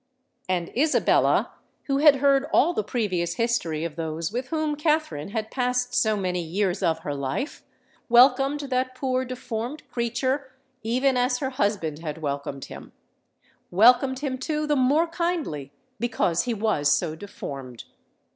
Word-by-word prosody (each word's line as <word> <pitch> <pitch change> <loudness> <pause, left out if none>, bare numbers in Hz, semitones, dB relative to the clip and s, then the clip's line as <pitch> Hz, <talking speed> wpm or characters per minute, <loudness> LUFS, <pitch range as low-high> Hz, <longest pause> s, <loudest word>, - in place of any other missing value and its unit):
And 175 -2 -2
Isabella, 300 +5 +3 0.3
who 275 -1 0
had 295 -1 +7
heard 275 0 +3
all 340 +5 +4
the 215 - -1
previous 190 -6 -1
history 230 -10 -1
of 165 -3 -5
those 160 +1 -3
with 250 +3 -3
whom 310 0 -1
Katherine 300 - 0
had 220 +1 -4
passed 250 -1 -1
so 215 -3 +2
many 180 -2 -1
years 185 +3 -1
of 165 -3 +1
her 145 - -3
life, 140 - -3 0.5
welcomed 270 +4 +5
that 255 -2 -2
poor 255 0 -1
deformed 250 +2 -5
creature 260 +3 -1 0.3
even 250 +4 +1
as 250 0 +2
her 265 0 -3
husband 200 - -1
had 155 -2 -5
welcomed 140 -2 -4
him,—welcomed 250 +7 0
him, 260 -3 -3
too, 305 +2 -2
the 300 -1 +1
more 280 +5 +3
kindly 330 - -3 0.3
because 225 -7 0
he 245 - -1
was 200 -10 +1
so 160 0 +1
deformed! 135 - -8
240 Hz, 145 wpm, -25 LUFS, 170-270 Hz, 0.5 s, had